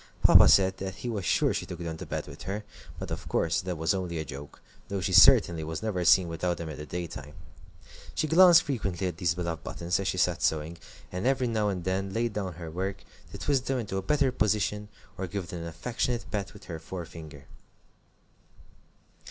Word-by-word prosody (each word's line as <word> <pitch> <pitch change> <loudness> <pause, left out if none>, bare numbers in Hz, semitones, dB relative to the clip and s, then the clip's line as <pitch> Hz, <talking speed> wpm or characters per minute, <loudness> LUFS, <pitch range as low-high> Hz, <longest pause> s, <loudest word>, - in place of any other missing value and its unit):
Papa - - +8
said 95 -1 +5
that 95 -1 -5
he 120 - -5
was 105 -5 -3
sure - - +2
she - - -3
took 90 - -6
them 85 -2 -5
to - - -8
bed - - -3
with - - -11
her, 100 +3 -4 0.3
but - - -6
of - - -5
course 80 0 +1
that 90 -2 -4
was 80 +4 +1
only 90 -3 -3
a 80 - -3
joke, 70 +1 -9 0.3
though 100 -1 -3
she 95 0 -2
certainly 85 -1 +7
was 80 0 -5
never 100 -5 -1
seen 90 +1 +5
without 85 +2 -2
them 85 -2 -6
in 75 - -7
the 75 - -8
daytime. 80 -4 -6 0.8
She - - +1
glanced 175 +2 +7
frequently 100 - -2
at 90 -3 -3
these 85 -1 0
beloved 85 -2 -4
buttons 85 +2 -2
as 100 - -2
she 90 - -1
sat 90 -1 +1
sewing, 80 +2 -1 0.3
and 90 +6 -2
every 130 -1 +2
now 110 -3 0
and 90 -3 -3
then 95 +1 -2
laid 115 -1 -1
down 95 -3 -3
her 85 -1 -8
work 95 +3 -4 0.3
to - - -7
twist 135 -3 0
them 135 - 0
into 105 -5 -3
a - - -1
better 140 +6 +2
position, 105 -2 0 0.3
or 95 - -2
give 95 -2 -5
them 90 -2 -6
an 85 - -5
affectionate 120 +8 -2
pat 100 -2 -3
with - - -13
her 80 -2 -7
forefinger. 80 -4 -9
95 Hz, 210 wpm, -28 LUFS, 85-105 Hz, 0.8 s, Papa